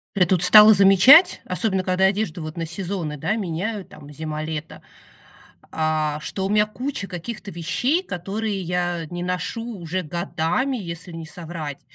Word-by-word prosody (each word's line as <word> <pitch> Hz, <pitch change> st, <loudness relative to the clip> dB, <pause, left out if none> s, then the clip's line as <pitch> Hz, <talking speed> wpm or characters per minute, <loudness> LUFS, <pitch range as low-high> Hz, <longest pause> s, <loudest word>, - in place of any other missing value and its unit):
Ре 185 Hz, -2 st, +4 dB
Тут 180 Hz, -1 st, +2 dB
стала 215 Hz, +3 st, +9 dB
замечать, 200 Hz, -, +7 dB
особенно 190 Hz, 0 st, 0 dB
когда 185 Hz, 0 st, 0 dB
одежду 190 Hz, -4 st, -1 dB
вот 155 Hz, +1 st, -7 dB
на 165 Hz, -, -3 dB
сезоны, 175 Hz, -2 st, -4 dB
да, 205 Hz, +9 st, -1 dB
меняю, 195 Hz, +2 st, -4 dB
там, 150 Hz, -1 st, -14 dB
зима-лето, 155 Hz, +1 st, -6 dB, 0.9 s
а, 155 Hz, -1 st, -1 dB
что 190 Hz, +4 st, -4 dB
у -, -, -2 dB
мя 210 Hz, 0 st, +3 dB
куча 235 Hz, 0 st, -5 dB
каких-то 200 Hz, +4 st, -7 dB
вещей, 245 Hz, -, -1 dB
которые 200 Hz, -, -4 dB
я 175 Hz, -1 st, -2 dB
не 175 Hz, +2 st, -6 dB
ношу 180 Hz, +5 st, -3 dB, 0.2 s
уже 175 Hz, +2 st, -3 dB
годами, 175 Hz, -, -2 dB
если 170 Hz, -3 st, -8 dB
не 165 Hz, -1 st, -7 dB
соврать. 160 Hz, -4 st, -7 dB
180 Hz, 150 wpm, -22 LUFS, 165-205 Hz, 0.9 s, стала